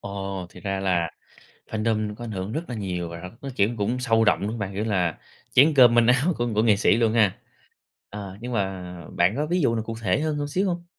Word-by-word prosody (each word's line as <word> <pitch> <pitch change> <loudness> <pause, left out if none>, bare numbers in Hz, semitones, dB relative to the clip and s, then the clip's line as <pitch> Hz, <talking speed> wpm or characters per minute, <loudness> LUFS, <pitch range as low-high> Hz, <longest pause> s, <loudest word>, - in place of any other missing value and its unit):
Ồ 95 -2 -5
thì - - -13
ra 95 -1 -2
là 90 -4 0 0.6
fandom 110 -1 -1
có 120 - -9
ảnh 115 - -6
hưởng 95 +1 -4
rất 160 +6 -2
là 120 - -4
nhiều 90 -5 -3
rồi, 85 0 -8 0.2
nó, 140 - -5
kiểu, 100 +2 +3
cũng 110 +5 -1
sâu 115 -3 +2
rộng, 105 - +3
đúng 100 - -1
không 115 +1 -5
bạn? 100 -1 -4
Kiểu 100 +2 -2
là 90 -7 0 0.3
chén 150 +5 +6
cơm 125 -3 +7
manh 120 -1 +5
áo 135 +8 +3
của 120 - 0
của 110 - +3
nghệ 110 -3 +5
sĩ 100 - +3
luôn 115 -2 +2
ha. 105 -5 +3 0.7
Ờ, 100 -2 -8
nhưng 125 +1 -5
mà 95 -3 -2 0.3
bạn 90 +6 +2
có 150 - 0
ví 175 +2 +1
dụ 115 -5 +2
nào 110 - -2
cụ 115 0 -5
thể 95 +5 +1
hơn 155 -1 -1
hơn 145 0 -2
xíu 185 +7 0
hông? 175 -1 -3
110 Hz, 250 wpm, -24 LUFS, 95-120 Hz, 0.7 s, cơm